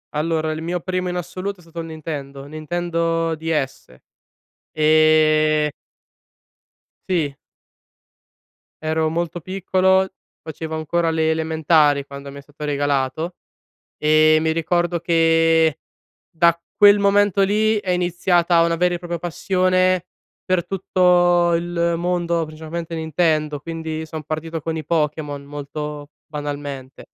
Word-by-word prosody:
Allora, 155 0 0
il 155 0 -4
mio 175 +2 -2
primo 185 0 -2
in 180 - -3
assoluto 185 +3 -4
è - - -17
stato 165 0 -10
il 165 - -5
Nintendo. 140 -3 -7
Nintendo 165 +2 -2
Ds. 150 - -3 0.8
Ehm 155 0 +4 1.4
Sì. 155 -6 0 1.5
Ero 160 0 +1
molto 170 +1 -3
piccolo, 190 +1 +1 0.3
facevo 160 0 -6
ancora 165 +2 0
le 160 0 +1
elementari 160 -2 +2
quando 140 0 -9
mi 140 - -9
è - - -10
stato 145 +1 -9
regalato. 145 +3 -1 0.6
Ehm, 155 +1 +4
mi 160 - +2
ricordo 175 +1 0
che 165 -1 +3 0.5
da 170 0 +3 0.2
quel 205 0 +7
momento 200 -1 +3
lì, 215 +2 +2
è 190 -3 -2
iniziata 175 -1 +2
una 170 0 +1
vera 175 +1 +1
e - - -3
propria 175 -1 -5
passione 185 +1 +1 0.4
per 185 -2 0
tutto 175 -2 +3
il 170 0 0
mondo, 170 -1 0
principalmente 160 +2 -6
Nintendo. 155 -2 0
Quindi 160 0 -5
son 155 -1 -7
partito 160 +2 -4
con 160 +1 -3
i 155 - -5
Pokémon, 150 -2 -2
molto 145 +1 -6 0.2
banalmente. 145 -3 -6
165 Hz, 120 wpm, -21 LUFS, 155-175 Hz, 1.5 s, quel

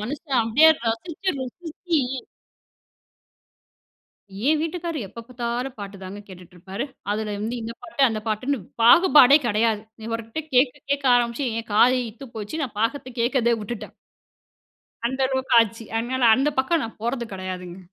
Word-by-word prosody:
மனுஷன் 270 +4 -2
அப்டியே, 250 +9 +5 0.2
ரசிச்சு 320 +12 -2
ருசிச்சு 320 +5 -3 2.5
என் 310 - +4
வீட்டுக்காரர் 330 - -3
எப்ப 230 - -10
பார்த்தாலும் 245 +1 -4
பாட்டு 200 0 -7
தாங்க 190 +2 -7
கேட்டுட்ருப்பாரு. 185 +4 -8 0.3
அதுல 210 0 -2
வந்து 230 +3 -2
இந்த 225 - -5
பாட்டு 285 - -2
அந்த 220 -2 -3
பாட்டுன்ன 255 +6 -1 0.2
பாகுபாடே 290 0 +8
கெடையாது. 220 -1 +1 0.3
இவர்கிட்ட 230 +5 -4
கேட்க 250 0 +4 0.2
கேட்க 280 0 0
ஆரம்பிச்சு 240 +3 0
என் 230 - -15
காது 250 +4 +5
இத்து 245 +5 -12
போச்சு. 215 +9 -5
நான் 250 - -8
பாகத்த 260 +4 -1
கேட்கிறதே 240 -1 +2
விட்டுட்டேன். 210 +2 -7 1.1
அந்த 260 +2 -3
அளவுக்கு 265 0 -1
ஆச்சு. 230 0 -1
அதனால 250 +3 -2
அந்த 275 +3 +2
பக்கம் 320 +4 0
நான் 225 - -9
போர்றது 235 0 -2
கெடையாதுங்க. 185 -1 -6
240 Hz, 135 wpm, -23 LUFS, 220-275 Hz, 2.5 s, பாகுபாடே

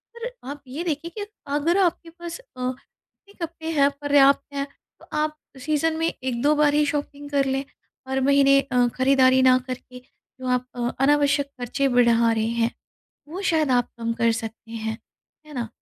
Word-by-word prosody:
और 470 +1 -5 0.2
आप 285 0 -7
ये 285 +7 -5
देखिए 330 0 -3
कि 410 - -3 0.3
अगर 315 +5 +2
आपके 350 -3 +1
पास 340 +3 -8
अ, - - -18 0.3
कितने 400 +9 -20
कपड़े 325 0 -8
हैं, 280 -2 +4
पर्याप्त 280 -1 +5
हैं, 280 0 -2 0.3
तो - - -16
आप 305 0 -1 0.2
सीज़न 310 +3 0
में 325 0 +1
1-2 260 +1 0
बार 295 -1 +3
ही 300 0 +3
शॉपिंग 290 -1 -4
कर 280 -1 +2
लें, 270 0 -1 0.4
हर 265 0 -1
महीने 275 0 +5
अ, 250 -3 +2
खरीदारी 260 0 +4
ना 255 0 +6
करके 255 0 -7 0.4
जो 255 - -4
आप 250 0 +1
अ, 240 -1 -1 0.2
अनावश्यक 285 0 +3
खर्चें 270 +3 0
बढ़ा 235 -1 +4
रहे 220 -1 0
हैं, 230 0 0 0.6
वो 350 +6 -6
शायद 315 -7 +1
आप 245 -1 +3
कम 230 0 -1
कर 230 0 +2
सकते 225 0 -6
हैं। 220 -1 -4 0.5
है 300 - -12
ना? 240 -4 -3
275 Hz, 180 wpm, -24 LUFS, 250-305 Hz, 0.6 s, ना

